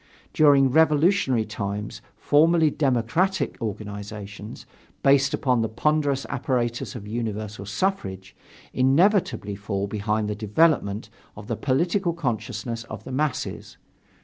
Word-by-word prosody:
During 140 -3 +5
revolutionary 155 - +3
times, 105 -1 -5
formally 160 +1 +3
democratic 140 +7 0
organizations, 105 -1 -7 0.4
based 135 -1 +4
upon 125 -3 +1
the 115 - -1
ponderous 140 +3 0
apparatus 125 -2 -2
of 105 -4 -8
universal 105 -3 -4
suffrage, 100 - -3 0.4
inevitably 160 - +2
fall 100 0 -3
behind 105 +1 -1
the 105 - -1
development 105 0 +1 0.3
of - - -9
the - - -2
political 170 +6 0
consciousness 115 - -3
of 110 -1 -8
the 130 - -8
masses. 140 0 -3
120 Hz, 110 wpm, -24 LUFS, 105-150 Hz, 0.4 s, During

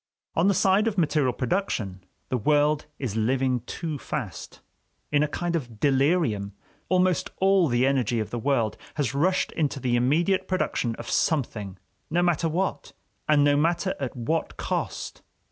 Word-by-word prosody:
On 165 +4 +3
the 200 - +3
side 195 +4 +3
of 210 -3 -1
material 150 -6 +2
production, 115 - -2 0.3
the 130 - 0
world 150 +5 +2
is 120 -7 -4
living 125 +3 +1
too 160 -4 -4
fast; 120 - -6 0.5
in 145 0 +3
a 150 - +2
kind 170 +3 -2
of 120 -9 -5
delirium, 135 - +2 0.4
almost 185 -2 +2
all 190 -2 +4
the 120 0 +2
energy 125 -4 +1
of 110 - -3
the 120 - -3
world 115 -4 0 0.2
has 145 -4 -1
rushed 180 +7 +1
into 145 -4 -1
the 125 -1 0
immediate 170 +10 +2
production 130 -10 -1
of - - -9
something, 105 - -1 0.3
no 175 +3 +2
matter 170 -2 +1
what, 160 -4 -2 0.4
and 150 -1 +5
no 145 0 +4
matter 170 +5 +1
at 135 -3 -4
what 155 +8 -2
cost. - - -3
145 Hz, 160 wpm, -26 LUFS, 120-170 Hz, 0.5 s, and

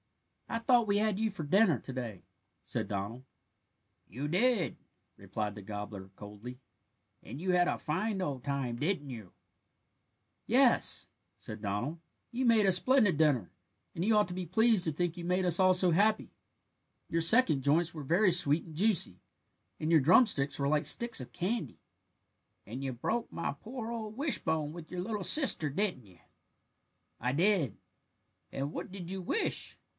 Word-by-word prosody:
"I 230 - -2
thought 235 -1 +3
we 200 0 +2
had 210 -1 +1
you 220 0 +1
for 175 -5 -6
dinner 175 - +3
to 130 - -8
day," 115 -7 -6 0.4
said - - -3
Donald. 105 +5 -4 0.9
"You 130 +9 -5
did," 195 +3 +1 0.4
replied 105 -1 -4
the 105 - -8
gobbler 105 -1 -7
coldly, 105 +5 -10 0.6
"and 135 - -8
you 185 +2 -1
had 180 0 +3
a - - -1
fine 200 +6 -2
old 140 -8 -3
time, 135 -4 -2
didn't 145 -1 -2
you?" 110 -7 -9 1.2
"Yes," - - +3 0.3
said 105 0 -9
Donald, 110 +11 -3 0.3
"you 255 +2 -2
made 225 -3 +4
a 190 - +5
splendid 205 - +3
dinner, 145 - +2 0.4
and 170 - -2
you 215 +2 +3
ought 210 - +3
to 180 - -6
be 185 0 -4
pleased 220 +3 +3
to 160 - +1
think 175 +2 -2
you 175 - -7
made 180 +2 0
us 175 -2 +1
all 185 0 +5
so 180 -1 +3
happy. 210 +6 +2 0.8
Your 165 - 0
second 165 - +4
joints 155 +5 +2
were 155 -3 -7
very 180 +7 +3
sweet 160 -2 +3
and 160 -3 -12
juicy, 180 - +2 0.6
and 155 - -2
your 160 -3 +6
drumsticks 155 - +4
were 140 - 0
like 150 +1 +1
sticks 235 - 0
of 125 - -9
candy." 215 +6 -3 0.9
"And 125 +6 -7
you 135 - -2
broke 220 - -3
my - - -3
poor 235 0 -7
old 220 -1 -6
wishbone 160 - -1
with 170 -2 -10
your 180 -1 -3
little 210 +1 -3
sister, 255 - +4
didn't 155 - -2
you?" 90 -2 -20 1.0
"I 125 +2 0
did." 165 - +2 0.7
"And 140 +2 -4
what - - -6
did 185 -2 -7
you 190 0 -4
wish?" 310 - -2
170 Hz, 170 wpm, -31 LUFS, 135-205 Hz, 1.2 s, your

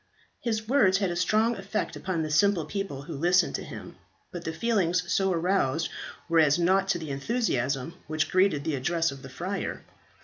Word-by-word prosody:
His 220 -2 -2
words 220 -8 +4
had 195 -3 0
a - - -3
strong 215 +6 +2
effect 200 +2 -3
upon 180 -4 -2
the 155 - -3
simple 175 +1 +3
people 190 -6 -4
who 165 +2 -7
listened 175 +5 +3
to - - -3
him, - - -9 0.3
but 175 -1 -7
the 160 - -1
feelings 180 -1 +1
so 190 +1 +2
aroused 165 -4 +1 0.4
were 165 -1 +3
as 150 -1 +5
nought 190 +3 +2
to 195 -2 +1
the 160 -4 -6
enthusiasm 140 - -1
which 155 0 -1
greeted 185 -6 +3
the 160 - -1
address 165 +4 0
of 135 -1 -10
the 135 - -10
friar. 180 +9 -4
175 Hz, 190 wpm, -27 LUFS, 155-195 Hz, 0.4 s, as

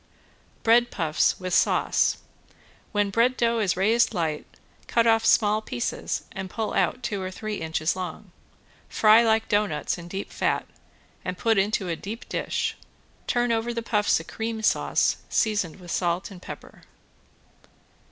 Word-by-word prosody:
~BREAD 235 +1 +5
PUFFS 160 -3 +1
WITH 185 -1 -4
SAUCE~ - - +2 0.7
When 205 -2 +1
bread 240 +4 +2
dough 235 -1 +2
is 200 -5 +1
raised 225 +4 +3
light, 160 -3 -2 0.4
cut 230 -1 +2
off 225 -1 +4
small 215 0 +4
pieces 120 - -3
and 190 -1 -6
pull 220 +2 -3
out 255 - 0
two 205 -4 -2
or 185 - -3
three 210 +2 -5
inches 160 +1 -1
long. 185 +1 -6 0.6
Fry 215 +1 +6
like 225 -1 +2
doughnuts 205 -6 0
in 170 - -9
deep 190 +3 -6
fat - - 0 0.6
and 180 0 -4
put 225 0 +2
into 195 -1 0
a 170 - -1
deep 210 +8 -8
dish, - - -2 0.5
turn 240 -1 +1
over 230 +1 -1
the 230 - -3
puffs 210 -5 +2
a - - -7
cream 225 +5 -5
sauce - - +2
seasoned 205 -7 0
with 175 -2 -9
salt 175 +2 -1
and 180 -2 -11
pepper. - - -10
210 Hz, 150 wpm, -25 LUFS, 180-225 Hz, 0.7 s, Fry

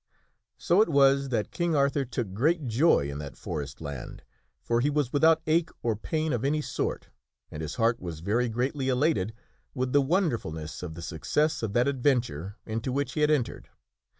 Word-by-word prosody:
So 180 +5 +3
it 220 - +3
was 140 -2 +4
that 115 -4 -1
King 170 -2 0
Arthur 140 0 +2
took 120 -5 -4
great 150 - +1
joy 120 - +3
in 70 0 -5
that 70 -2 -8
forest 70 -3 -5
land, 70 -4 -7 0.4
for 120 0 +1
he 145 - +2
was 145 -4 0
without 160 +2 +4
ache 165 +1 +2
or 115 -2 +1
pain 155 +8 -2
of 120 0 -1
any 145 +3 +1
sort 150 - -3 0.4
and 75 - -6
his 80 0 -4
heart 115 +1 +2
was 85 -3 -6
very 115 +7 +1
greatly 130 +4 -1
elated 125 - +1 0.4
with 130 -1 -1
the 145 - +6
wonderfulness 125 - -1
of 85 -3 -6
the 85 - -8
success 150 - 0
of 110 -3 -3
that 120 +3 +3
adventure 120 - 0
into 115 +3 -3
which 140 +2 -1
he 155 - -1
had 150 - +4
entered. 140 -6 -1
125 Hz, 185 wpm, -28 LUFS, 100-150 Hz, 0.4 s, the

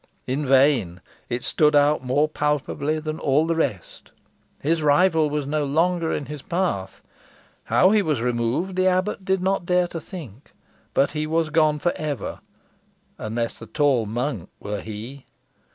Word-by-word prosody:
In 140 +2 -2
vain. 130 -10 +3 0.3
It 120 +1 -2
stood 150 -1 +3
out 145 -1 +4
more 140 +4 +2
palpably 150 0 -1
than 155 0 -4
all 145 +3 +2
the 165 0 0
rest. 125 - -3 0.5
His 160 +3 0
rival 155 +1 +3
was 150 -1 -2
no 150 +1 -1
longer 165 +3 +1
in 145 - -2
his 150 -1 -7
path. 170 - -2 0.6
How 185 - +4
he 215 -1 +4
was 155 - 0
removed 125 +10 -1
the 185 0 +2
abbot 185 +2 0
did 190 0 0
not 190 -1 0
dare 180 0 +3
to 165 - -6
think. 145 - -11 0.4
But 140 - +3
he 155 0 -2
was 160 0 0
gone 155 -1 +3
for 175 +4 0
ever, 145 -8 -4 0.8
unless 115 +2 -3
the 115 - -10
tall 130 -2 +1
monk 120 - -3
were 105 0 -4
he! 115 +6 -8
150 Hz, 160 wpm, -23 LUFS, 130-165 Hz, 0.8 s, out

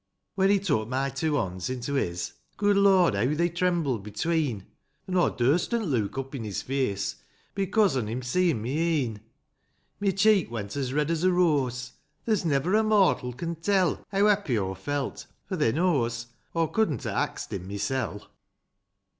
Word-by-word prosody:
II. - - -54
When 195 0 +2
he 200 - +5
took 145 - 0
my 135 +2 0
two 150 +3 -1
bonds 95 -8 -2
into 130 +2 -3
his. 90 -10 -2 0.2
Good 205 0 +3
Lord, 195 -3 +5
heaw 140 +6 0
they 170 +1 +2
trembled 170 - 0
between; 115 - -1 0.4
An' 185 - -2
aw 175 - +4
durstn't 170 - +1
look 120 - -1
up 135 +1 -4
in 130 -5 -4
his 105 -3 -4
face, 100 -8 -1 0.4
Becose" 195 -3 +2
on 120 -5 -1
him 120 +4 -4
seein' 155 -3 +1
my 120 - -3
e'en; 145 -8 0 0.8
My 200 -1 +1
cheek 195 - +3
went 105 -3 -5
as 135 -3 -2
red 150 +3 0
as 165 0 -1
a 185 - +4
rose; 135 -8 +1 0.2
— - - -45
There's 215 -4 +1
never 155 +4 +1
a 215 - +5
mortal 200 -12 +3
can 165 +7 -4
tell 185 +1 +1
Heaw 200 +1 +3
happy 200 - +2
aw 95 -2 -1
felt; 140 +9 -4 0.2
for, 190 - -3
thae 150 -9 +2
knows. 120 -8 0 0.3
Aw 165 0 +3
couldn't 160 - 0
ha' - - 0
axed^ - - -9
him 95 -1 -5
mysel'. 105 +1 -3
145 Hz, 180 wpm, -27 LUFS, 120-180 Hz, 0.8 s, he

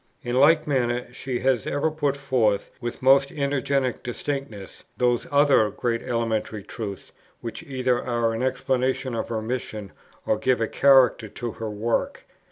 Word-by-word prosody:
In 120 0 -2
like 155 +3 +5
manner 125 -3 -1
she 130 -1 -4
has 130 -4 +1
ever 145 +3 0
put 145 -3 -1
forth, 125 -7 +1
with 120 +1 -5
most 135 +1 +5
energetic 140 -3 -1
distinctness, 120 -5 -5
those 120 -1 +1
other 140 -6 +4
great 115 +3 -2
elementary 110 -3 -2
truths, 100 -3 -7 0.3
which 115 - -6
either 130 -2 -1
are 120 -2 0
an 115 - -3
explanation 130 0 0
of 115 - -3
her 110 -2 -2
mission 110 -4 -4 0.3
or 110 - +1
give 130 0 +2
a 115 - 0
character 130 -5 +4
to 115 +3 -5
her 110 0 -6
work. 110 +3 -2
125 Hz, 155 wpm, -24 LUFS, 115-135 Hz, 0.3 s, like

